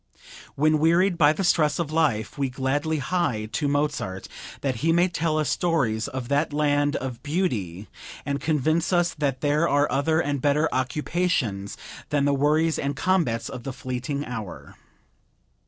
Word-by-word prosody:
When 155 +2 +3
wearied 170 +4 +3
by 150 -3 +5
the 175 +5 -2
stress 155 -4 +3
of 165 -3 -2
life 145 -10 0
we 140 -2 -1
gladly 140 +5 -1
hie 145 -8 -1
to 150 - -1
Mozart 145 -10 -1 0.3
that 135 -4 -1
he 160 +8 +1
may 175 +2 +4
tell 165 -3 -1
us 155 - 0
stories 130 -11 0
of 130 -3 -5
that 145 +3 +1
land 145 -1 +1
of 125 -2 -4
beauty, 115 - -2 0.4
and 140 0 -2
convince 155 +3 +1
us 175 -1 +2
that 140 -4 -2
there 150 +3 +2
are 145 0 +3
other 160 +3 +1
and 145 -4 -1
better 150 +3 +2
occupations 130 - -1 0.3
than 145 -1 +1
the 145 - +2
worries 155 +3 +2
and 140 0 -2
combats 140 -10 0
of 125 - -7
the 135 - -5
fleeting 130 +2 -4
hour. 110 -6 -7
145 Hz, 160 wpm, -25 LUFS, 130-160 Hz, 0.4 s, by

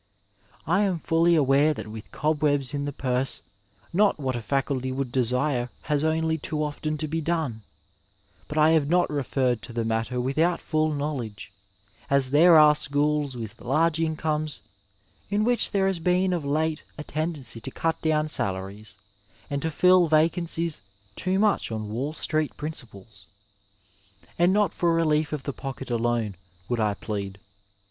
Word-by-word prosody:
I 180 +6 +2
am 195 -4 +1
fully 165 +1 +2
aware 145 +1 +3
that - - -6
with 110 0 -9
cobwebs 150 -3 0
in 145 0 -2
the 145 - -3
purse 130 -1 -2 0.5
not 200 -2 +3
what 130 -3 -2
a 120 - -3
faculty 135 +1 -1
would 130 -1 -3
desire 125 +1 0
has 150 -1 0
only 160 0 0
too 155 +1 -2
often 155 +1 -3
to 155 +1 -3
be 165 +2 -2
done, 155 -9 -2 0.9
but 150 - -6
I 155 +1 +5
have 155 -3 +2
not 175 0 +2
referred 130 -4 0
to 120 - -9
the 115 -1 -2
matter 115 +2 -1
without 155 +8 +1
full 155 0 0
knowledge, 135 -9 -4 0.6
as 140 -2 +3
there 165 +3 +7
are 150 -1 +7
schools 145 -2 +1
with 115 0 -7
large 160 +5 +1
incomes 155 - -1 0.7
in 205 +1 +1
which 245 +1 +5
there 195 -2 +1
has 190 -3 0
been 180 +2 +1
of 170 -4 -2
late 155 +2 -1 0.2
a 150 - -6
tendency 150 -7 -3
to 135 - -6
cut 165 +4 -2
down 155 -1 +1
salaries 100 -4 -1 0.5
and 140 0 -1
to 160 - -1
fill 180 +2 +4
vacancies 165 - +1 0.3
too 185 +1 -1
much 205 - +1
on 110 -1 -4
Wall 135 +7 -3
Street 155 -1 -1
principles. 110 -9 -7 1.1
And 175 +1 +4
not 205 -3 +2
for 170 -1 +1
relief 155 -2 +1
of 150 -3 -4
the 140 - -4
pocket 135 -1 -7
alone 115 -4 -1 0.3
'^^ould 120 - 0
I 105 -2 +1
plead. 100 -2 -5
150 Hz, 160 wpm, -25 LUFS, 125-160 Hz, 1.1 s, there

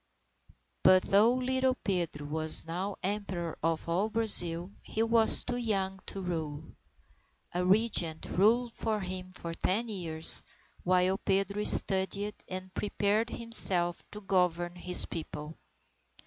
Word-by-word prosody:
But 185 0 +4
though 210 +5 +2
little 260 0 -1
Pedro 170 - -4
was 155 +2 +4
now 185 +4 -6
Emperor 190 -4 -5
of 165 +1 -3
all 185 +6 -2
Brazil, 185 -6 +5
he 220 - -4
was 230 -1 +2
too 245 - -5
young 195 -5 -3
to 195 - -7
rule. 160 -3 -7 0.8
A 180 +1 -2
Regent 185 -5 -1
ruled 230 +5 0
for 220 -2 -4
him 185 0 -7
for 170 -2 -8
ten 215 +7 -3
years, 165 -6 +2 0.4
while 185 +1 0
Pedro 195 +1 -2
studied 200 +2 +5
and 185 0 -9
prepared 210 +2 -2
himself 185 -8 0
to 210 - -9
govern 180 -3 -2
his 180 0 +2
People. 155 -1 -9
190 Hz, 125 wpm, -28 LUFS, 175-210 Hz, 0.8 s, Brazil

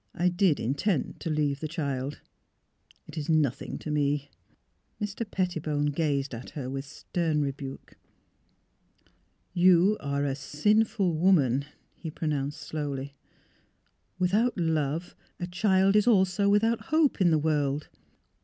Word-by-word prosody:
I 180 +1 +2
did 175 -4 +2
intend 145 - -1
to 165 - -4
leave 150 -2 0
the 155 - -3
child. 140 -3 -3 0.8
It 160 - -7
is 150 - -5
nothing 150 -6 +1
to 155 - -6
me." 145 -1 0 0.7
Mr. 210 +1 -4
Pettibone 155 -6 -1
gazed 140 -3 -1
at 115 +2 -7
her 130 -3 -5
with 135 +1 -4
stern 155 +1 -1
rebuke. 135 -1 -6 0.8
'' - - -43 0.7
You 185 +3 +5
are 140 0 -1
a 140 - 0
sinful 195 - +1
woman," 150 -6 +3 0.3
he 165 - -7
pronounced, 150 -2 -3
slowlj^. 140 -3 -3 0.5
" - - -44
Without 205 +7 +2
love, 160 -1 -1 0.2
a 175 - -2
child 190 +2 +2
is 210 +2 +4
also 200 -2 +3
without 220 +2 +2
hope 310 -8 +2
in 180 - +5
the 160 - +4
world. 150 -2 0
155 Hz, 135 wpm, -28 LUFS, 145-185 Hz, 0.8 s, You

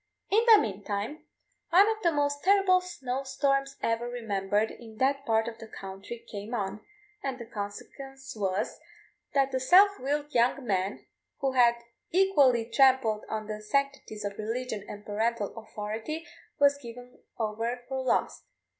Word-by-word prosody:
In 435 +3 +5
the 435 - +11
meantime 205 +7 -3 0.4
one 380 +5 +6
of 440 0 -1
the 340 - +3
most 285 -1 0
terrible 385 -1 +5
snow 275 -8 -4
storms 275 0 0
ever 230 +1 0
remembered 210 -3 -1
in 225 -2 -12
that 275 +2 +1
part 225 0 +2
of 230 -1 -6
the 225 - -9
country 195 +3 -8
came 210 +3 -5
on, 200 -1 -3 0.4
and 270 -7 -3
the 235 - -8
consequence 265 +6 -7
was, 195 -2 -2 0.6
that 275 -1 +3
the 260 - 0
self 385 +9 +6
willed 290 +3 -2
young 245 +3 +2
man, 195 -1 -1 0.4
who 270 -1 +1
had 240 -2 +5 0.3
equally 285 -11 +4
trampled 255 -3 +3
on 215 0 -3
the 215 0 -5
sanctities 275 -3 -2
of 200 0 -5
religion 225 -1 -3
and 205 0 -8
parental 215 0 -1
authority, 225 +8 -5 0.3
was 285 0 +5
given 245 0 -11 0.2
over 230 +2 -2
for 265 0 -2
lost. 260 - 0
245 Hz, 150 wpm, -29 LUFS, 215-275 Hz, 0.6 s, the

